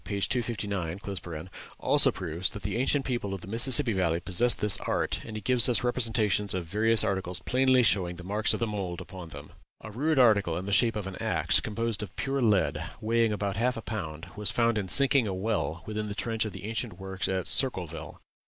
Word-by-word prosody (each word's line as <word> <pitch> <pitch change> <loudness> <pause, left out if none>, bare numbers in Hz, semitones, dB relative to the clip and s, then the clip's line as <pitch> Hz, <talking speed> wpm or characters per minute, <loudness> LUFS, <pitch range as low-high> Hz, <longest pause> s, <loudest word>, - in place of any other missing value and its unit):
259) 100 -5 -3 0.3
also - - +5
proves 85 +1 -3
that 105 - -9
the - - -3
ancient 135 +3 +1
people 120 -6 -2
of 95 - -9
the - - -11
Mississippi 120 +3 +2
Valley 85 -3 0
possessed 100 +7 +1
this 105 -1 +4
art, - - -2
and 110 - -9
he - - -6
gives 125 +2 +5
us 120 -3 +3
representations 110 -5 +1
of 90 -2 -3
various 110 +6 +3
articles 95 -4 -2
plainly 130 0 +3
showing 90 -5 +1
the 90 - -10
marks 105 +4 0
of - - -1
the 115 - 0
mould 95 -5 -4
upon 90 -4 -9
them. 75 -1 -11 0.3
A 110 - -9
rude 145 +7 0
article 100 -9 +4
in 90 - -5
the 100 - -4
shape 115 +2 +3
of 105 -2 -4
an 95 -1 -7
axe, - - +2
composed 115 0 -2
of 105 -3 -7
pure 135 0 -2
lead, 105 -5 +1 0.2
weighing 115 0 +1
about 100 -1 -3
half 125 +2 0
a - - -5
pound, 80 -8 -6
was 105 -2 0
found 115 -1 +1
in 100 - -4
sinking 135 +2 +4
a 95 - -3
well 95 -6 -2
within 110 0 -4
the 100 - -5
trench 115 0 -1
of 110 - -4
the - - -9
ancient 110 -3 -4
works 95 0 -4
at 95 -1 -2
Circleville. 90 - -1
105 Hz, 210 wpm, -28 LUFS, 95-115 Hz, 0.3 s, also